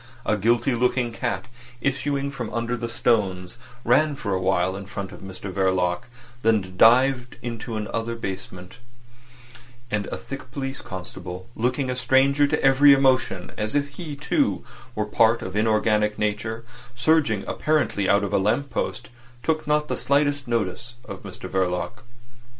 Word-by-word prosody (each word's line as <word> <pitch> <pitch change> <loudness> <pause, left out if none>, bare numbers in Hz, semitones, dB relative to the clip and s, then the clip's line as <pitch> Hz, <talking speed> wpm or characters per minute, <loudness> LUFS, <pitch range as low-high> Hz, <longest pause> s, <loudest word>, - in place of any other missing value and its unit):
A 110 - +2
guilty 120 +5 +2
looking 125 0 +1
cat 120 +2 -3 0.3
issuing 140 +2 -1
from 125 -5 -5
under 115 +2 -1
the 115 -1 -4
stones 105 -3 0 0.3
ran 145 +5 +4
for 105 -7 -3
a 95 - 0
while 95 0 +1
in 100 0 -7
front 100 -3 -6
of 90 - -10
Mr 95 +1 -7
Verloc, 90 -2 +1 0.4
then 105 -5 +1
dived 125 +4 +4
into 115 -1 -5
another 115 +2 -3
basement; 95 -2 -7 1.1
and 105 -1 -1
a - - -4
thick 135 -1 -8
police 135 0 -4
constable, 90 0 -7
looking 125 +3 0
a - - -2
stranger 135 +3 +3
to - - 0
every 135 +1 +7
emotion, 130 -9 +2
as 105 +3 -1
if 145 0 +1
he 150 0 -7
too 150 - 0 0.3
were 105 - 0
part 115 +2 +3
of 95 +1 -6
inorganic 105 -1 +2
nature, 110 +2 -2 0.3
surging 120 -6 +2
apparently 150 -10 0
out 100 +1 +4
of 100 - -3
a - - +4
lamp 120 +8 0
post, - - -3 0.3
took 155 -1 0
not 150 0 +2
the - - -1
slightest 145 -1 +1
notice 115 +1 -2
of - - -8
Mr - - -8
Verloc. 95 +6 -1
115 Hz, 155 wpm, -24 LUFS, 100-135 Hz, 1.1 s, every